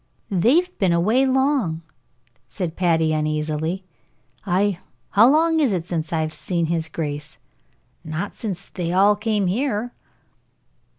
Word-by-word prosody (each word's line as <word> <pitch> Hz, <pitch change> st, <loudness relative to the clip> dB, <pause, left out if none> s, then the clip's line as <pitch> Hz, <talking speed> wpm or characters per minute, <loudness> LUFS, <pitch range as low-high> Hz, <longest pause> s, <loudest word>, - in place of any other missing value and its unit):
"They've 275 Hz, -, +2 dB
been 185 Hz, -4 st, +3 dB
away 220 Hz, +11 st, +3 dB
long," 260 Hz, -, +1 dB, 0.6 s
said 175 Hz, -5 st, -4 dB
Patty, 160 Hz, -3 st, +2 dB
uneasily. 155 Hz, +3 st, -1 dB, 0.6 s
"Ay. 190 Hz, 0 st, +1 dB, 0.3 s
How 225 Hz, +5 st, +6 dB
long 320 Hz, +2 st, +3 dB
is 270 Hz, -9 st, +2 dB
it 170 Hz, -3 st, -2 dB
since 165 Hz, -3 st, -3 dB
I've 160 Hz, -1 st, -1 dB
seen 170 Hz, -1 st, -2 dB
his 165 Hz, 0 st, -2 dB
grace? 150 Hz, -1 st, -5 dB, 0.7 s
Not 160 Hz, +5 st, -4 dB
since 195 Hz, -4 st, -5 dB
they 170 Hz, -2 st, -3 dB
all 200 Hz, +3 st, +5 dB
came 210 Hz, -1 st, 0 dB
here." 230 Hz, +3 st, -1 dB
180 Hz, 125 wpm, -22 LUFS, 160-220 Hz, 0.7 s, How